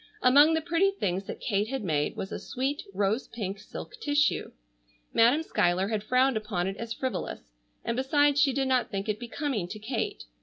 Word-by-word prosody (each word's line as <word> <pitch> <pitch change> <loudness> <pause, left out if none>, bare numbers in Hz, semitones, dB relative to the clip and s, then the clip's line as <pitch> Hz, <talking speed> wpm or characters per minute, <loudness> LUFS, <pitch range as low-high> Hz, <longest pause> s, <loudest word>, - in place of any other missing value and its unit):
Among 290 +5 +7
the 320 - +1
pretty 345 +4 +2
things 195 - -2
that - - -6
Kate 205 -1 0
had 265 -1 -3
made 150 -5 0
was 190 - -5
a - - -4
sweet 270 +3 -2
rose 200 +5 0
pink 200 -4 -5
silk 210 - -9
tissue. 290 -2 +1 0.6
Madam 245 +8 +5
Schuyler 185 - +1
had 215 -2 -1
frowned 255 +3 +3
upon 210 -5 -2
it 195 +1 -2
as 230 0 -6
frivolous, 255 - -4 0.3
and 230 - -1
besides 290 +2 +3
she 285 -2 +4
did 270 0 0
not 255 -1 +2
think 195 +1 -3
it 210 0 -1
becoming 240 - -3
to 215 - -7
Kate. 225 +3 -3
235 Hz, 190 wpm, -28 LUFS, 200-280 Hz, 0.6 s, Among